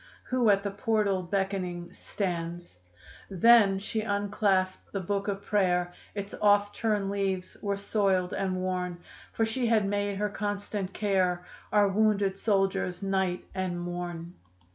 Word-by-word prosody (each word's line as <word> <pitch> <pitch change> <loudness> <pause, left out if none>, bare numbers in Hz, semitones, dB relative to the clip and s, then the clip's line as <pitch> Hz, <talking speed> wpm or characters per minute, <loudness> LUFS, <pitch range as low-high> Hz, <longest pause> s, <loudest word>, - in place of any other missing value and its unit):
Who 250 -3 +3
at 200 -1 +4
the 200 - -2
portal 205 -2 +1
beckoning 185 -2 -2
stands. 175 - -4 0.5
Then 200 0 +6
she 215 +3 -3
unclasped 200 -2 0
the 200 - -2
book 200 +2 -2
of 200 0 -3
prayer, 180 -4 +1 0.2
Its 200 -1 -5
oft 205 0 +4
turned 210 -3 0
leaves 195 -2 -2
were 200 -1 -1
soiled 195 -3 +1
and 190 -1 -1
worn, 180 -1 -2 0.3
For 225 - +1
she 235 +2 -1
had 220 -3 +3
made 205 0 -1
her 210 +1 0
constant 205 -1 -3
care 185 -4 0 0.3
Our 205 -1 +5
wounded 200 -1 +2
soldiers 195 -3 0
night 190 -2 0
and 185 -2 -2
morn. 175 -1 -5
195 Hz, 140 wpm, -28 LUFS, 185-205 Hz, 0.5 s, Then